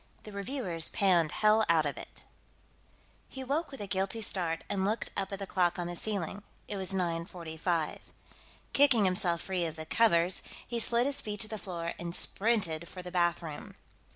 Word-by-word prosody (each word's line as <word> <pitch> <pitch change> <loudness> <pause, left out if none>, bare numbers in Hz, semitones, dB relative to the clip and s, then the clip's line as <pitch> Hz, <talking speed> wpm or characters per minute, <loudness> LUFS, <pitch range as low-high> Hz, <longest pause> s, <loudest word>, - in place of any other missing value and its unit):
The 215 - -9
Reviewers 200 - -2
Panned 175 -6 +3
Hell 215 +1 +4
Out 160 -2 +4
of 145 - -1
It - - -7 1.1
He 265 - -6
woke 295 +5 -1
with 270 -5 -8
a - - -2
guilty 195 +3 -1
start 170 -5 -1
and 195 -2 -1
looked 215 +3 -1
up 195 0 -1
at 195 - -3
the 195 - -4
clock 180 -2 +1
on 175 - -2
the 175 0 -4
ceiling; 200 0 -2 0.3
it 205 - -4
was 190 -1 -2
0945. 170 -2 -1 0.7
Kicking 270 -7 +5
himself 180 -2 +2
free 185 -3 -1
of 160 -1 -4
the 160 0 -7
covers, 175 -2 +4 0.3
he 240 -1 -2
slid 235 +1 +5
his 280 0 0
feet 210 -1 -5
to 220 - 0
the 215 0 -5
floor 170 -2 -4
and 170 0 -3
sprinted 190 -7 +1
for 180 +1 -9
the 180 - -7
bathroom. 170 -3 -1
190 Hz, 180 wpm, -31 LUFS, 170-215 Hz, 1.1 s, Kicking